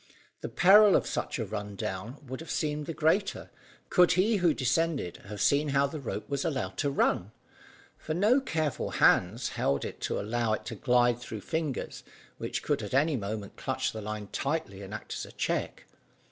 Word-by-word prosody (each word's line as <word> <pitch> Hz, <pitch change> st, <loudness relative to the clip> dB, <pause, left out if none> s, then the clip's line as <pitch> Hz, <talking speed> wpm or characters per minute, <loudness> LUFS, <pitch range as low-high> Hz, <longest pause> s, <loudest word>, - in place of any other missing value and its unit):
The -, -, -4 dB
peril 205 Hz, +2 st, +7 dB
of -, -, +2 dB
such -, -, -3 dB
a 115 Hz, -, -2 dB
run 105 Hz, 0 st, -5 dB
down 100 Hz, +8 st, -5 dB
would 130 Hz, 0 st, -6 dB
have 165 Hz, -, -9 dB
appeared 150 Hz, -1 st, -1 dB
the 165 Hz, -, -3 dB
greater, 190 Hz, +6 st, +1 dB, 0.4 s
could 180 Hz, -1 st, +5 dB
he 205 Hz, +5 st, +3 dB
who 175 Hz, -3 st, +3 dB
descended 140 Hz, -, 0 dB
have 105 Hz, 0 st, -7 dB
seen 145 Hz, +2 st, +3 dB
how 140 Hz, 0 st, +3 dB
the 150 Hz, +2 st, -5 dB
rope 115 Hz, -5 st, -5 dB
was 140 Hz, -1 st, -2 dB
allowed 145 Hz, -6 st, -2 dB
to 145 Hz, -, +1 dB
run. 105 Hz, -7 st, +1 dB, 0.7 s
For 155 Hz, -, -3 dB
no 215 Hz, +9 st, +4 dB
careful 160 Hz, -, -1 dB
hands 110 Hz, +8 st, +3 dB
held 70 Hz, 0 st, 0 dB
it -, -, -7 dB
to -, -, -1 dB
allow 110 Hz, +1 st, 0 dB
it 110 Hz, -, -3 dB
to 115 Hz, -, -5 dB
glide 120 Hz, +1 st, +3 dB
through 110 Hz, -3 st, -7 dB
fingers, 160 Hz, -2 st, -3 dB, 0.4 s
which -, -, -3 dB
could -, -, 0 dB
at -, -, -4 dB
any 150 Hz, +2 st, +3 dB
moment 105 Hz, -2 st, -5 dB
clutch -, -, -1 dB
the 110 Hz, -, -6 dB
line 105 Hz, -1 st, -5 dB
tightly 140 Hz, -9 st, -2 dB
and 100 Hz, 0 st, -9 dB
act 105 Hz, -, -6 dB
as -, -, -4 dB
a -, -, -12 dB
check. -, -, -2 dB
135 Hz, 190 wpm, -29 LUFS, 110-160 Hz, 0.7 s, peril